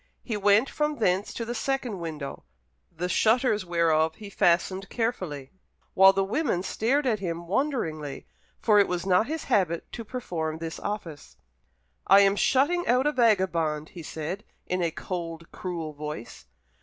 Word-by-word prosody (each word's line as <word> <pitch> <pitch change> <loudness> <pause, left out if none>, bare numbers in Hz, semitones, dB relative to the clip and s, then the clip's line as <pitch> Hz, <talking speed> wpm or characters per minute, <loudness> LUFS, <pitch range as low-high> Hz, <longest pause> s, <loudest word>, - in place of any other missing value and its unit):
He 230 - -3
went 205 +4 +4
from 300 +1 -1
thence 195 -2 +1
to 230 - -3
the 240 - -3
second 250 -6 -2
window, 155 -4 -6 0.5
the 170 +2 -3
shutters 220 0 +2
whereof 160 -2 +2
he 210 -2 -10
fastened 185 +2 +1
carefully, 185 - -3 0.4
while 190 +1 +8
the 195 0 +1
women 200 - 0
stared 265 +9 0
at 225 -5 +1
him 170 -2 -4
wonderingly, 170 - -2 0.3
for 210 -2 +4
it 200 - +4
was 180 0 -2
not 190 +4 +3
his 315 +1 -3
habit 185 - 0
to 230 - -6
perform 170 -10 -4
this 165 0 -6
office. 180 -8 -6 0.7
"I 195 +1 +8
am 200 0 +4
shutting 290 +11 +2
out 250 +3 +3
a 295 - +3
vagabond," 185 - +1
he 175 - -9
said, 160 +6 -5 0.2
in 180 0 -1
a 170 - +1
cold, 165 -1 -6
cruel 170 -4 -5
voice. 150 -4 -7
190 Hz, 155 wpm, -27 LUFS, 165-230 Hz, 0.7 s, while